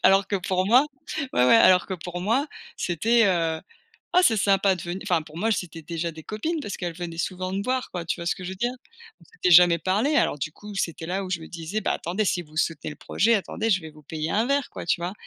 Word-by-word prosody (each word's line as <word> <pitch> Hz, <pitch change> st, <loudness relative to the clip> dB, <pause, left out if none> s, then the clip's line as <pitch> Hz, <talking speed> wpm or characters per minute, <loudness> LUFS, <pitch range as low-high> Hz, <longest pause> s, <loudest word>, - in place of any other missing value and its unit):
Alors 195 Hz, 0 st, +5 dB
que 200 Hz, -, +1 dB
pour 185 Hz, 0 st, -1 dB
moi 255 Hz, +7 st, +5 dB, 0.5 s
ouais 125 Hz, -, +3 dB
ouais, 230 Hz, -, +7 dB
alors 185 Hz, -5 st, +6 dB
que 190 Hz, -, -3 dB
pour 175 Hz, +1 st, -6 dB
moi 235 Hz, +10 st, +1 dB, 0.3 s
c'était, 225 Hz, +7 st, +2 dB
heu: 165 Hz, -3 st, +1 dB, 0.5 s
«Ah 360 Hz, -, +6 dB
c'est 225 Hz, -, +4 dB
sympa 195 Hz, -1 st, +3 dB
de -, -, -8 dB
ven» 175 Hz, +2 st, -4 dB
enfin 175 Hz, -6 st, +1 dB
pour 155 Hz, +1 st, -11 dB
moi 220 Hz, +4 st, +1 dB
c'était 165 Hz, -3 st, -4 dB
déjà 165 Hz, +1 st, -3 dB
des 160 Hz, 0 st, -11 dB
copines. 310 Hz, +11 st, -3 dB
Parce 205 Hz, -, -5 dB
qu'elles 175 Hz, -2 st, -4 dB
venaient 170 Hz, -2 st, -6 dB
souvent 185 Hz, +2 st, -3 dB
me 200 Hz, +1 st, -1 dB
voir 255 Hz, +2 st, -2 dB
quoi, 175 Hz, -2 st, -4 dB
tu 170 Hz, +1 st, -3 dB
vois 170 Hz, -, -6 dB
ce -, -, +1 dB
que 185 Hz, -, -9 dB
je -, -, -4 dB
veux 190 Hz, -, -7 dB
dire? 240 Hz, +5 st, -1 dB, 0.5 s
On -, -, -19 dB
s'était 455 Hz, -, -2 dB
jamais 175 Hz, 0 st, +8 dB
parlé. 210 Hz, -, +1 dB
Alors -, -, +2 dB
du 155 Hz, -, -3 dB
coup 210 Hz, -1 st, -11 dB
c'était 165 Hz, -2 st, -3 dB
là 190 Hz, +2 st, -2 dB
où 185 Hz, -, -7 dB
je 170 Hz, -3 st, -1 dB
me 160 Hz, -, -9 dB
disais: 175 Hz, +5 st, -4 dB
«Bah, -, -, 0 dB
attendez, 190 Hz, +6 st, -2 dB
si 175 Hz, -2 st, 0 dB
vous 155 Hz, -1 st, -18 dB
soutenez 155 Hz, -2 st, -1 dB
le 150 Hz, -, -9 dB
projet 230 Hz, +4 st, +1 dB
attendez, 220 Hz, +2 st, -1 dB
je 185 Hz, -2 st, +3 dB
vais 160 Hz, -1 st, -9 dB
vous 150 Hz, 0 st, -17 dB
payer 155 Hz, +1 st, -4 dB
un 220 Hz, +4 st, +2 dB
verre, 280 Hz, -1 st, +1 dB
quoi», -, -, -7 dB
tu 170 Hz, -, +1 dB
vois? 175 Hz, +2 st, -3 dB
185 Hz, 265 wpm, -25 LUFS, 170-210 Hz, 0.5 s, jamais